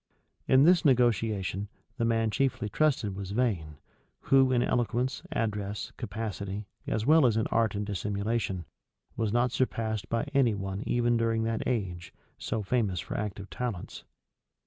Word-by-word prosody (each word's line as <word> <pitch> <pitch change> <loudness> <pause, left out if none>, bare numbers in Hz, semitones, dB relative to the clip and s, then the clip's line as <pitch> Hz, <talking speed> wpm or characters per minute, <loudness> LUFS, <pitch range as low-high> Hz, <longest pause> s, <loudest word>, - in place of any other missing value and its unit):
300 - - +2
In - - +7
this 175 0 +5
negotiation, 110 - +2 0.3
the 115 - +1
man 115 -1 +1
chiefly 130 -3 0
trusted 115 -6 +1
was 95 -1 -5
Vane, 95 - -1 0.4
who, 135 -1 +4
in 120 -1 +3
eloquence, 125 +1 0
address, 105 -2 -2
capacity, 105 -2 -4 0.2
as 110 0 -1
well 155 +2 +6
as 110 -2 +1
in 110 - +1
art 110 -3 +2
and 105 +1 -2
dissimulation, 100 -1 -2 0.5
was 110 -2 -1
not 120 +2 +2
surpassed 110 -4 -1
by 115 0 0
any 125 -6 +3
one 95 0 -4
even 120 -1 +2
during 115 -1 +1
that 115 0 -1
age, 90 -8 -3 0.2
so 110 -2 -2
famous 100 -4 0
for - - -5
active 100 -2 -4
talents. 115 -2 -5
110 Hz, 150 wpm, -29 LUFS, 100-120 Hz, 0.5 s, In